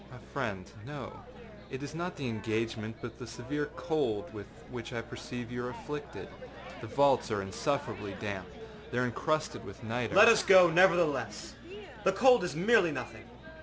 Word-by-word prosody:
â -, -, -11 dB
âMy 110 Hz, -, -15 dB
friend, 105 Hz, -9 st, -3 dB
no. 140 Hz, -1 st, -7 dB, 0.6 s
It 130 Hz, +1 st, -6 dB
is 145 Hz, -, -6 dB
not 175 Hz, +3 st, -4 dB
the 140 Hz, -3 st, -4 dB
engagement, 110 Hz, 0 st, -3 dB
but 120 Hz, -2 st, -7 dB
the 125 Hz, -, -8 dB
severe 130 Hz, +6 st, -4 dB
cold 115 Hz, -12 st, -1 dB
with 105 Hz, -2 st, -8 dB, 0.2 s
which 125 Hz, 0 st, -6 dB
I 115 Hz, -, -2 dB
perceive 120 Hz, 0 st, -7 dB
you 120 Hz, 0 st, -4 dB
are 125 Hz, -, -3 dB
afflicted. 150 Hz, +3 st, -7 dB, 0.5 s
The -, -, -7 dB
vaults 140 Hz, -3 st, +3 dB
are 105 Hz, -3 st, -1 dB
insufferably 105 Hz, -1 st, -3 dB
damp. 100 Hz, -3 st, -4 dB, 0.4 s
They 120 Hz, -, -4 dB
are 125 Hz, -, +2 dB
encrusted 155 Hz, +6 st, -1 dB
with 135 Hz, -, -11 dB
nitre.â 115 Hz, +1 st, -2 dB
âLet 220 Hz, -, +10 dB
us 225 Hz, -2 st, +7 dB
go, 185 Hz, -3 st, +7 dB
nevertheless. 160 Hz, -, +3 dB, 0.5 s
The 190 Hz, -, +3 dB
cold 245 Hz, +3 st, +5 dB
is 175 Hz, -, -3 dB
merely 190 Hz, 0 st, +4 dB
nothing. -, -, -6 dB
125 Hz, 170 wpm, -31 LUFS, 115-155 Hz, 0.6 s, âLet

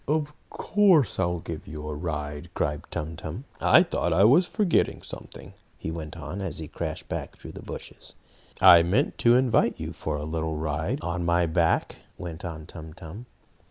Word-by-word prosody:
"Of 150 Hz, 0 st, 0 dB, 0.2 s
course 190 Hz, -, +3 dB
I'll 90 Hz, -1 st, +1 dB
give -, -, -7 dB
you 75 Hz, 0 st, -7 dB
a 75 Hz, -, -3 dB
ride!" 75 Hz, -2 st, -4 dB
cried 75 Hz, 0 st, -1 dB
Tum 80 Hz, +2 st, -4 dB
Tum. 80 Hz, -, -6 dB, 0.2 s
"I 170 Hz, -, +6 dB
thought 170 Hz, -, -1 dB
I 90 Hz, +4 st, +4 dB
was 145 Hz, -, +6 dB
forgetting 205 Hz, -5 st, +1 dB
something," -, -, -10 dB, 0.2 s
he 80 Hz, -, -5 dB
went 80 Hz, 0 st, -6 dB
on, 80 Hz, +5 st, -6 dB
as 95 Hz, -3 st, -4 dB
he 80 Hz, -, -5 dB
crashed -, -, -5 dB
back -, -, -5 dB
through -, -, -10 dB
the -, -, -10 dB
bushes. -, -, -10 dB, 0.4 s
"I 85 Hz, -, +9 dB
meant 95 Hz, -, +1 dB
to 120 Hz, 0 st, +5 dB
invite 125 Hz, -2 st, +3 dB
you -, -, -5 dB
for 75 Hz, -, -3 dB
a 75 Hz, 0 st, -4 dB
little 80 Hz, 0 st, -2 dB
ride 80 Hz, +1 st, -2 dB
on 85 Hz, +1 st, -2 dB
my 85 Hz, 0 st, +3 dB
back," 80 Hz, 0 st, +1 dB, 0.2 s
went 85 Hz, -2 st, -7 dB
on 80 Hz, -3 st, -6 dB
Tum 80 Hz, -1 st, -10 dB
Tum. 95 Hz, +11 st, -10 dB
85 Hz, 185 wpm, -26 LUFS, 80-110 Hz, 0.4 s, I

